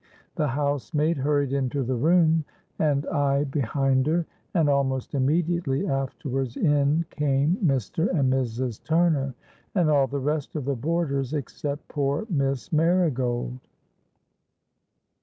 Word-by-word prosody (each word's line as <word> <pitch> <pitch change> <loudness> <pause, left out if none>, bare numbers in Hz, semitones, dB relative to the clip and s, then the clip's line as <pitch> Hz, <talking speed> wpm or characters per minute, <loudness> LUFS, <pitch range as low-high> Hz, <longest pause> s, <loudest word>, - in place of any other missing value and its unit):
The 155 -4 0
housemaid 145 +3 0
hurried 140 0 +1
into 135 0 0
the 130 +2 -1
room, 160 +4 +3 0.4
and 145 -2 +1
I 145 -3 +1
behind 135 -1 0
her; 165 +2 +1 0.3
and 165 -4 +3
almost 135 -2 0
immediately 150 +1 +1
afterwards 135 -2 -2
in 145 +1 +2
came 145 +2 +1
Mr. 145 - +1
and 135 -6 +2
Mrs. 125 -2 -2
Turner, 160 -6 +1 0.4
and 170 -5 +3
all 140 -2 +4
the 140 - -3
rest 150 +2 -2
of 145 -4 -3
the 140 - 0
boarders, 140 -1 -1
except 145 +1 -4
poor 145 +5 -1
Miss 135 - -1
Marigold! 135 -7 +1
140 Hz, 120 wpm, -25 LUFS, 135-155 Hz, 0.4 s, all